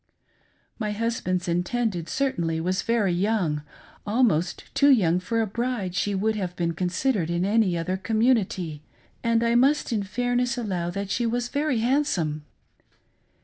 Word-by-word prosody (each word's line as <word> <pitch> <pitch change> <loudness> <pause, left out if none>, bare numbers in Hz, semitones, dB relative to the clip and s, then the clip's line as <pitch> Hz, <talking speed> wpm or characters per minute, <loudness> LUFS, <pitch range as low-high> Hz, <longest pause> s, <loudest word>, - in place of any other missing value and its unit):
My 210 -2 -1
husband's 205 -5 -1
intended 180 +1 -1
certainly 170 -13 -1
was 185 +3 0
very 220 -6 +1
young 180 -5 0 0.2
— - - -23 0.2
almost 205 -7 +1
too 285 - +4
young 180 -10 +4
for 230 +5 -1
a - - +1
bride 230 -3 -2
she 200 +2 0
would 220 +3 0
have 185 -4 -3
been 170 -1 -1
considered 180 +2 0
in 170 +1 0
any 200 -4 +2
other 180 +3 -2
community 200 - 0 0.2
— - - -35
and 230 0 +2
I 235 0 +2
must 265 +2 +3
in 215 - +1
fairness 245 +5 -1
allow 185 -7 -2
that 200 +2 -4
she 240 -1 0
was 240 +1 -1
very 285 -5 0
handsome. 190 - 0
205 Hz, 155 wpm, -25 LUFS, 175-235 Hz, 0.2 s, too